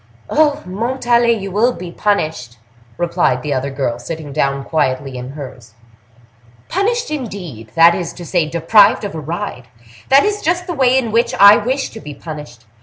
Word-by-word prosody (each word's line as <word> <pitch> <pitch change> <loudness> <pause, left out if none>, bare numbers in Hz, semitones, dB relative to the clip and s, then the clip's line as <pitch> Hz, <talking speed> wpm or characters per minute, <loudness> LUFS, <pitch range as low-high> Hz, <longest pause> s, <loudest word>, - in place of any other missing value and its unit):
"Oh! 300 -1 +2
Montalais, 235 +3 +1
you 195 -1 -6
will 230 +6 +2
be 180 -4 -8
punished!" 155 - -2 0.4
replied 170 -7 0
the 150 - -1
other 135 +1 -2
girl, 135 -3 -3
sitting 150 +2 -7
down 140 -2 0
quietly 135 -3 -1
in 125 +2 -7
hers. 125 -6 -10 0.9
"Punished, 455 +3 -1
indeed!—that 170 - +1
is 170 -1 -3
to 175 - -10
say, 165 -2 0
deprived 185 +7 +4
of 200 - -4
a 160 - -5
ride! 155 - -5 0.4
That 275 +5 +6
is 415 0 -1
just 350 +2 0
the 355 - -4
way 260 -4 +3
in 235 -4 -1
which 230 +2 +1
I 200 +1 +9
wish 260 +5 -2
to 220 - -9
be 150 -7 -9
punished. 145 -7 -9
175 Hz, 170 wpm, -17 LUFS, -, 0.9 s, I